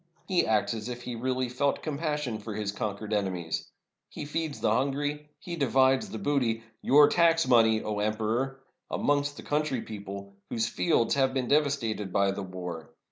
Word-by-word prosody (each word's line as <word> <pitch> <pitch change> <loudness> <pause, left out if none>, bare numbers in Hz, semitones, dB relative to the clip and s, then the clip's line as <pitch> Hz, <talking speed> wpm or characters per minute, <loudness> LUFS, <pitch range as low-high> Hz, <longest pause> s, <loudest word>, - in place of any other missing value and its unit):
He 185 -2 +2
acts 110 +1 +2
as 110 +1 -5
if 120 0 -6
he 125 - -4
really 130 +2 -1
felt 135 +3 0
compassion 150 -6 -2
for 105 0 -6
his 105 -1 -2
conquered 105 +1 -4
enemies! 90 -5 -2 0.4
He - - -6
feeds 155 0 -3
the - - +2
hungry, 145 +3 -1
he 175 -3 -6
divides 135 -2 +3
the 110 - -5
booty 120 -4 0
— 110 - -41
your 145 +2 +7
tax 165 -3 +4
money, 110 -3 +5
O 105 -1 -2
Emperor! 110 +6 -1
— - - -54
amongst 145 0 0
the - - -8
country 150 -4 0
people, 100 -2 -8 0.2
whose 115 0 0
fields 120 -4 +2
have 135 -1 +2
been 130 -2 0
devastated 135 -9 +1
by 100 +1 +3
the 100 - -4
war. 90 -3 -6
125 Hz, 180 wpm, -28 LUFS, 105-145 Hz, 0.4 s, your